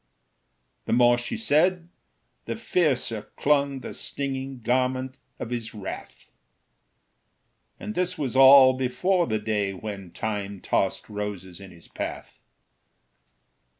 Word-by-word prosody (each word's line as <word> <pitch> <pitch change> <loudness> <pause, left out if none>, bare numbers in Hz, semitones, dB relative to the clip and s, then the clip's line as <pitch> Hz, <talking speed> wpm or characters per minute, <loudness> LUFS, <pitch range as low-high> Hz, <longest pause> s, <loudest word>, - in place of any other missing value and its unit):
The - - -1
more 120 0 +5
she 120 - -4
said, 180 -3 +2 0.6
the - - -3
fiercer 140 - -1
clung 140 -2 +1
The - - -7
stinging 135 -2 -4
garment 130 +2 -1 0.2
of 115 - -6
his 115 -2 -4
wrath; 100 -2 -8 1.5
And 215 - -5
this 180 -1 -1
was 135 -4 -3
all 135 0 +8
before 170 +8 0
the 110 - 0
day 105 -2 -1
When 100 -2 -7
Time 100 +1 -4
tossed 95 - -1
roses 100 -3 -6
in 95 - -10
his 85 -2 -14
path. - - -7
125 Hz, 115 wpm, -25 LUFS, 105-140 Hz, 1.5 s, all